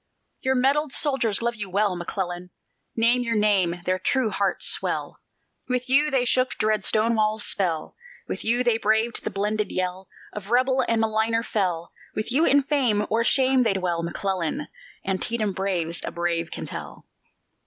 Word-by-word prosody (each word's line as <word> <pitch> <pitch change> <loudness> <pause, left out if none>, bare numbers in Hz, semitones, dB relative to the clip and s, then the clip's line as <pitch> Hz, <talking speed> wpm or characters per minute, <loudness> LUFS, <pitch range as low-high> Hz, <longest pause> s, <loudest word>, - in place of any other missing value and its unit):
Your 265 0 +1
medalled 275 +2 +2
soldiers 235 -8 0
love 235 0 +1
you 210 -4 -6
well, 200 0 +1
McClellan! 175 0 -4 0.5
Name 235 +2 +3
your 230 -1 -1
name, 195 -5 +2
their 185 0 0
true 240 +3 +1
hearts 200 0 0
swell; - - -1 0.5
With 250 0 -1
you 290 +3 +4
they 265 -3 +1
shook 255 +1 +1
dread 215 -1 +1
Stonewall's 215 -1 +2
spell, 170 -5 -1 0.3
With - - -4
you 240 +3 +2
they 235 -2 +2
braved 220 +2 +1
the - - -2
blended 210 +1 -1
yell 185 +1 -3 0.3
Of 205 -1 -7
rebel 255 +2 +3
and 230 -1 +2
maligner 225 +1 +1
fell; 175 -5 -1 0.2
With 215 +3 -3
you 300 +6 +3
in 280 +1 +4
fame 250 -8 +1
or 230 +1 +2
shame 260 +1 +3
they 225 -5 +2
dwell, 180 -3 -1
McClellan! 185 - -3 0.4
Antietam 205 +2 -1
braves 180 -4 -2
a - - -3
brave 170 -1 -2
can - - -6
tell. - - -8
215 Hz, 165 wpm, -24 LUFS, 190-245 Hz, 0.5 s, you